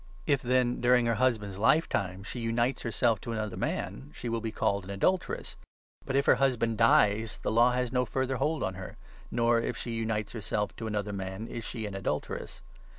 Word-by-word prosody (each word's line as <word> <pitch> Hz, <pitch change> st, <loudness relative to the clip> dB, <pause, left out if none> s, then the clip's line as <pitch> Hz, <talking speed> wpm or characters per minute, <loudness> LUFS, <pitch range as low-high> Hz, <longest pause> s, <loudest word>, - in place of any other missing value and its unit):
If, 140 Hz, -5 st, +2 dB
then, 125 Hz, 0 st, +1 dB
during 125 Hz, 0 st, +4 dB
3 -, -, +1 dB
her 115 Hz, -, +2 dB
husband's 105 Hz, -6 st, 0 dB
lifetime, 100 Hz, -, +2 dB
she 115 Hz, +4 st, -6 dB
unites 120 Hz, +3 st, 0 dB
herself 115 Hz, -1 st, +1 dB
to 115 Hz, -, -4 dB
another 110 Hz, -2 st, -3 dB
man, 65 Hz, +4 st, -3 dB
she 120 Hz, -, -5 dB
will 115 Hz, 0 st, -1 dB
be 110 Hz, -1 st, -3 dB
called 100 Hz, -2 st, 0 dB
an 95 Hz, -, -11 dB
adulteress; 170 Hz, -, -1 dB, 0.5 s
but, 135 Hz, -, -1 dB
if 140 Hz, +1 st, +3 dB
her -, -, +7 dB
husband 120 Hz, -4 st, +1 dB
dies, 110 Hz, -1 st, +4 dB
the -, -, -2 dB
law 120 Hz, +2 st, +5 dB
has 125 Hz, -1 st, 0 dB
no 125 Hz, -1 st, +2 dB
further 130 Hz, +2 st, -1 dB
hold 150 Hz, +4 st, 0 dB
on 95 Hz, -, -1 dB
her, 95 Hz, 0 st, -8 dB, 0.3 s
nor, 115 Hz, 0 st, +2 dB
if -, -, -3 dB
she 120 Hz, -, -4 dB
unites 110 Hz, -2 st, -2 dB
herself 105 Hz, -3 st, -2 dB
to 115 Hz, -, -4 dB
another 105 Hz, -1 st, -2 dB
man, 95 Hz, +2 st, -4 dB
is 115 Hz, -, -6 dB
she 110 Hz, 0 st, -4 dB
an 105 Hz, -, -5 dB
adulteress. 95 Hz, 0 st, -4 dB
115 Hz, 205 wpm, -29 LUFS, 105-125 Hz, 0.5 s, her